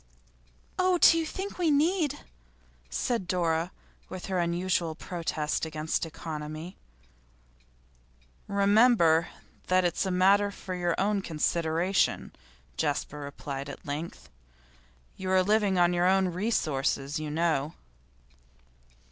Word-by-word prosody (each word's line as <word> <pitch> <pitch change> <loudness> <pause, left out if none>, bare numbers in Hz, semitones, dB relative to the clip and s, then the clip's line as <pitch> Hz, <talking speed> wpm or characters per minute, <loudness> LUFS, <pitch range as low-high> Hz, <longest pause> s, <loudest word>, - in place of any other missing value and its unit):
'Oh, 370 -1 +3
do 335 - +7
you 325 -1 0
think 385 +3 -6
we 340 -3 +2
need?' 310 +1 +1 0.7
said 210 - -2
Dora, 170 -2 0 0.4
with 185 +1 -7
unusual 175 -1 0
protest 160 -3 -3
against 160 +1 -2
economy. 155 +2 -7 1.7
'Remember 200 -5 +4 0.4
that 185 0 +3
it's 175 - 0
a 190 - -2
matter 195 +3 +4
for 190 -1 -7
your 175 -2 -1
own 200 +1 +1
consideration,' 170 +2 0 0.5
Jasper 150 -1 -2
replied 140 -1 -6
at - - -10
length. 150 +3 -6 0.9
'You 190 0 -4
are 185 0 +4
living 205 -1 +2
on 175 0 +4
your 175 +1 +2
own 190 0 +3
resources, 155 -7 -1
you 155 -1 -4
know. 155 -2 0
175 Hz, 110 wpm, -28 LUFS, 160-200 Hz, 1.7 s, do